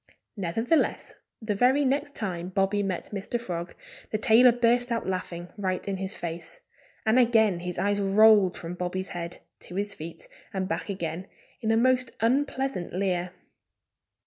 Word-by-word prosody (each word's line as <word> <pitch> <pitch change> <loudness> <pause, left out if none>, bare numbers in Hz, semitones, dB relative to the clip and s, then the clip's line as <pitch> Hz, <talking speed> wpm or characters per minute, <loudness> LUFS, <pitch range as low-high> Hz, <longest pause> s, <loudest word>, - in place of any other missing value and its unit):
Nevertheless, 225 - 0 0.3
the 215 -1 0
very 255 +7 +3
next 285 +2 0
time 180 -5 -3
Bobby 195 +2 +1
met 190 -3 -3
Mr. 205 +4 -3
Frog 175 -6 -5 0.3
the 215 - -1
tailor 225 +4 +6
burst 240 +1 +2
out 230 - -1
laughing, 180 -2 -4
right 185 -2 -2
in 195 -1 -1
his 190 0 -4
face. 165 -1 -6 0.4
And 220 +3 +4
again 220 -6 +4
his 180 0 -5
eyes 205 0 +1
rolled 200 -1 +5
from 165 +1 -6
Bobby's 180 +1 -3
head 175 0 -6 0.2
to 180 - -10
his 200 +1 -1
feet, 165 -3 -9 0.3
and 190 -1 -1
back 165 +4 -3
again, 185 -1 -4 0.3
in 220 - -1
a 225 - +4
most 255 +1 +2
unpleasant 265 -3 0
leer. 180 -2 0
200 Hz, 155 wpm, -27 LUFS, 180-230 Hz, 0.4 s, tailor